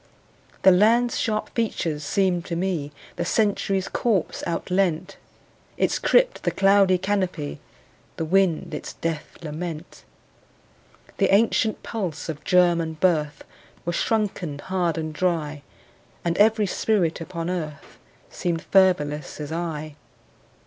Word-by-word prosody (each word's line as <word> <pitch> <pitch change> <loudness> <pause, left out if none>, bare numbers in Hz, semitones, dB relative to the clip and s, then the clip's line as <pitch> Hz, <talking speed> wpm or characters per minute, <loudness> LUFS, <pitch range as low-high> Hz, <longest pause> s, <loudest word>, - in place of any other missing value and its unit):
The 190 - +8
land's 230 +6 +4
sharp 215 -1 -1
features 165 -9 -2
seemed 180 +1 +1
to 170 - -3
me 170 -5 -2 0.3
The 175 - -1
Century's 195 -1 +1
corpse 215 -8 -1
outleant, 180 +1 -1 0.6
Its - - +1
crypt - - +3
the - - +1
cloudy 195 -1 +4
canopy, 185 - -2 0.6
The 165 - -2
wind 185 -1 +1
its - - -5
death 160 -2 -4
lament. 160 +1 -6 1.1
The - - +2
ancient 220 +1 +2
pulse 185 -9 -4
of 150 -1 -5
germ 175 -2 +4
and 160 -1 -5
birth 155 -5 +1 0.4
Was 175 0 -1
shrunken 195 -10 -1
hard 175 +1 -1
and 155 -1 -3
dry, 155 -4 -1 0.6
And 170 -1 +1
every 215 0 +4
spirit 185 -4 0
upon 165 0 -5
earth 155 -5 -6 0.3
Seemed 170 -2 -2
fervorless 150 -8 +2
as 150 0 -5
I. 155 -3 -4
175 Hz, 120 wpm, -24 LUFS, 160-195 Hz, 1.1 s, The